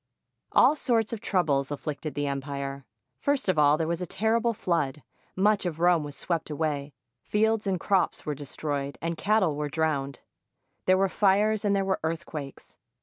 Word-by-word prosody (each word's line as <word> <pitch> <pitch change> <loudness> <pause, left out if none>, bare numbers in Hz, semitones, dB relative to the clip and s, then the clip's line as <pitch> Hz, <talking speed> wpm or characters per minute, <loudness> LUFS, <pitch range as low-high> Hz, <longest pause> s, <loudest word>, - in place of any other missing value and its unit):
All 270 +5 +5
sorts 230 -6 +1
of 220 - -5
troubles 145 -11 +1
afflicted 150 +1 -5
the 145 - -1
empire. 140 -1 -4 0.3
First 285 -5 0
of 185 -5 +2
all, 145 0 +5
there 160 -1 -1
was 170 +1 -2
a 180 - -3
terrible 225 +5 +1
flood. 160 - -1 0.3
Much 205 +2 +3
of 170 -3 -3
Rome 175 -2 +4
was 145 -1 -7
swept 165 -3 -2
away, 150 -2 -2 0.3
fields 220 - +1
and 185 -2 0
crops 190 +1 +1
were 150 - -1
destroyed, 140 -1 -4
and 170 0 -2
cattle 195 -4 +2
were 150 0 -2
drowned. 140 -4 -1 0.7
There 185 0 +5
were 195 +1 +3
fires, 210 +2 +2
and 200 -1 +2
there 195 -1 +1
were 190 0 0
earthquakes. 160 -3 -5
165 Hz, 170 wpm, -27 LUFS, 145-200 Hz, 0.7 s, All